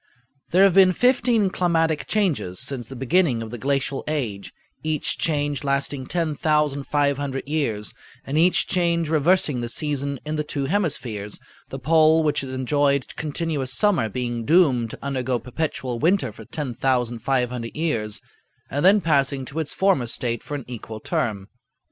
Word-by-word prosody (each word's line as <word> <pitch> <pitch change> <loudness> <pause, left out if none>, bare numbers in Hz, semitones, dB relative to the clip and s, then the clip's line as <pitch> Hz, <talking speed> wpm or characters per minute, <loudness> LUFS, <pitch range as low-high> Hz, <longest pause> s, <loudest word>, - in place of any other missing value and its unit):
"There 185 +3 +5
have 195 -2 +5
been 185 -1 +6
fifteen 235 -3 +3
climatic 165 -4 +1
changes 170 - 0
since 125 -2 -1
the 135 - -9
beginning 135 -2 +1
of 110 - -8
the 120 - -6
glacial 140 +1 -1
age, 120 -10 -3 0.3
each 155 -2 -1
change 145 -3 0
lasting 140 -1 -1
10,500 145 -4 0
years, 125 -9 -2 0.3
and 135 - -4
each 170 +3 +3
change 170 -3 +1
reversing 155 -4 +2
the 120 - -3
season 140 0 -1
in 155 +1 -3
the 150 - 0
two 145 -2 -3
hemispheres, 135 - -2 0.3
the - - -5
pole 160 0 +4
which 150 -1 +1
had 135 - -6
enjoyed 140 +1 0
continuous 150 -3 -2
summer 195 - +2
being 120 0 -3
doomed 135 -6 +3
to - - -8
undergo 130 -2 -1
perpetual 125 -2 -3
winter 160 - +2
for 110 +1 -12
10,500 125 -2 -1
years, 115 -10 -2 0.5
and 145 - -1
then 200 +3 +6
passing 140 -4 +1
to 140 +5 -5
its 155 -2 -2
former 190 -11 +2
state 120 0 -2
for 145 - -6
an 140 - -6
equal 110 -2 -7
term. 100 -3 -2
140 Hz, 150 wpm, -23 LUFS, 125-160 Hz, 0.5 s, been